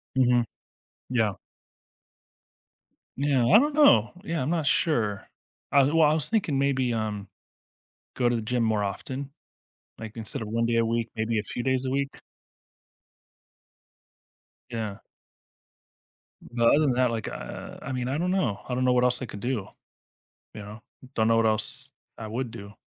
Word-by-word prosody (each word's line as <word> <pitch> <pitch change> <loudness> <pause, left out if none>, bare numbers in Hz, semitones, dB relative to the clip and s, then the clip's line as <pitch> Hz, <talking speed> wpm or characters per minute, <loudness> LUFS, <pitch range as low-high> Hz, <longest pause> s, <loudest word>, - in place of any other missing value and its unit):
Mhm, 125 -2 +3 0.7
yeah. 110 -6 +1 1.8
Yeah, 135 -4 +2
I 135 - +7
don't 295 +2 0
know, 120 - +5
yeah, 165 -6 -2
I'm 130 - -2
not 165 -3 0
sure, 115 - +1 0.4
I 140 -1 +5
well, 160 +4 +2
I 150 +1 +5
was 155 -3 +2
thinking 190 -11 0
maybe, 135 -3 +1
um, 105 -3 -3 0.9
go 125 -2 +1
to 120 - +1
the 115 - -2
gym 120 +1 -1
more 110 -2 +1
often, 130 +8 -5 0.7
like, 110 0 -9
instead 110 0 +1
of 105 - -5
1 115 +1 0
day 115 0 0
a 115 - +3
week, 115 0 -1
maybe 110 0 -1
a - - -3
few 120 - -5
days 130 0 0
a - - -1
week. 140 +1 -2 2.5
Yeah. 110 -4 -5 1.4
But 120 -1 0
other 145 - +4
than 140 -5 +2
that, 125 -1 +2
like, 110 -2 -3
uh, - - -8
I 135 - -6
mean, 125 -1 -2
I 135 - -1
don't 180 +3 -1
know 180 - 0
I 125 - -3
don't 130 +1 0
know 125 0 +3
what 125 0 +3
else 125 +1 +4
I - - -3
could 100 -2 -8
do, 120 -3 -3 0.9
you 105 - -8
know 105 +2 -10 0.3
don't 110 0 +2
know 115 0 +4
what 115 - +3
else 110 -1 +2 0.3
I 110 - -7
would 120 +1 -4
do. 100 -3 -10
120 Hz, 170 wpm, -26 LUFS, 110-135 Hz, 2.5 s, I